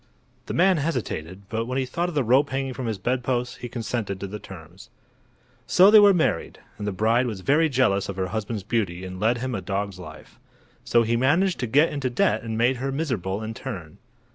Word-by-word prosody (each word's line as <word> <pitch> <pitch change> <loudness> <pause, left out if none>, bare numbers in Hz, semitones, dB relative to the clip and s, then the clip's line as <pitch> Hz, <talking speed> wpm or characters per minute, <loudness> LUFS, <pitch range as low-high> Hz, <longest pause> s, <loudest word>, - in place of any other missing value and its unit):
The - - -4
man 185 +1 +4
hesitated, 105 - -3
but 115 +2 -3
when 130 +1 -2
he 135 - 0
thought 170 +8 -2
of 170 - -8
the 145 - +2
rope 130 +5 +3
hanging 135 0 -2
from 125 -1 -5
his 110 -2 -2
bedpost 125 +3 -1
he 120 - -6
consented 115 -5 -3
to 100 - -4
the 105 +2 -6
terms. 90 -2 -12 0.8
So 190 +3 +6
they 215 - +9
were 205 -1 +7
married, 175 -5 0 0.2
and 105 - -4
the - - 0
bride 115 +6 +2
was 105 -5 -5
very 155 - +3
jealous 120 -8 +1
of 100 - -4
her 95 -1 -2
husband's 110 -1 -4
beauty 95 -5 -2
and 95 0 -7
led 115 +4 +2
him 130 +1 -3
a 95 - -3
dog's 100 -1 -3
life. 80 -3 -12 0.4
So 120 -1 +3
he 115 +1 0
managed 165 +10 +2
to 125 - -2
get 145 +8 +3
into 140 -3 -2
debt 110 -3 +1
and 110 -1 -4
made 125 +3 +2
her 135 +2 -3
miserable 110 - -2
in 110 +1 -5
turn. 100 - -8
115 Hz, 215 wpm, -24 LUFS, 100-135 Hz, 0.8 s, they